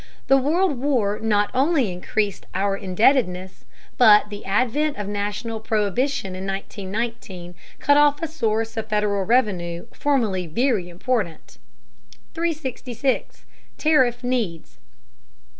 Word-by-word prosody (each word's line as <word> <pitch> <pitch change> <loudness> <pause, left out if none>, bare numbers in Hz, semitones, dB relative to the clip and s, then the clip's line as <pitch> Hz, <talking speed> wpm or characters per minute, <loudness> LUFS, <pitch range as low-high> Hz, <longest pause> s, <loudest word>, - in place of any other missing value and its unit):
The 270 - +7
World 300 +1 +1
War 240 -7 0
not 210 -2 +1
only 270 - +2
increased 200 +3 -2
our 195 +1 +1
indebtedness, 190 - +1 0.3
but 210 -3 +6
the 205 - -7
advent 255 +8 0
of 205 - -4
national 210 +3 -3
prohibition 215 0 -1
in 190 +1 -5
1919 195 -1 -5 0.2
cut 285 +1 +3
off 290 0 +4
a 330 - -2
source 225 -6 -1
of 220 0 -3
Federal 210 -2 +1
revenue 185 -8 0
formerly 220 -11 0
very 210 - 0
important. 185 -2 -3 0.7
366. 275 -6 -3 0.3
TARIFF 260 -6 +2
NEEDS. 230 -10 -3
220 Hz, 110 wpm, -23 LUFS, 195-260 Hz, 0.7 s, The